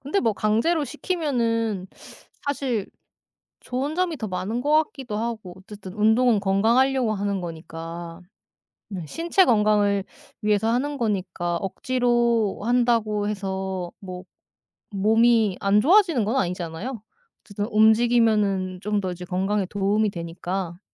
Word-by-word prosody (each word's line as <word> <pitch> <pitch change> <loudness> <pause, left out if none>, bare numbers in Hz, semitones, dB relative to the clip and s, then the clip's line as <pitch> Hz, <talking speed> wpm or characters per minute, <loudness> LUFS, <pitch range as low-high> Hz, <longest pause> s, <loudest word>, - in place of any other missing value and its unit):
근데 285 +9 -1
뭐 225 -3 +2
강제로 230 +11 +1
시키면은 235 - -1 0.6
사실 260 -7 -1 0.7
좋은 270 +5 -3
점이 355 -2 0
더 220 -5 -5
많은 195 +6 -3
것 295 +3 0
같기도 255 -8 -7
하고 220 -5 -4
어쨌든 190 -1 -11
운동은 220 +1 +3
건강하려고 230 +5 +2
하는 200 -1 -2
거니까. 165 +1 -7 0.7
네 180 -5 -5
신체 340 - +2
건강을 210 -3 +2 0.4
위해서 210 +1 +1
하는 280 +5 0
거니까 185 -6 -2
억지로 235 +1 0
한다고 230 -3 +1
해서 190 -3 -4
뭐 185 -2 -8 0.7
몸이 220 0 +3
안 200 +1 +3
좋아지는 335 - +4
건 225 +6 -1
아니잖아요? 180 +4 -3 0.4
어쨌든 205 0 -5
움직이면은 215 -4 +3
좀 210 -1 -1
더 185 -1 -3
이제 180 0 -7
건강에 190 +2 -1
도움이 205 +2 +1
되니까. 175 +1 -5
210 Hz, 280 characters per minute, -24 LUFS, 190-240 Hz, 0.7 s, 좋아지는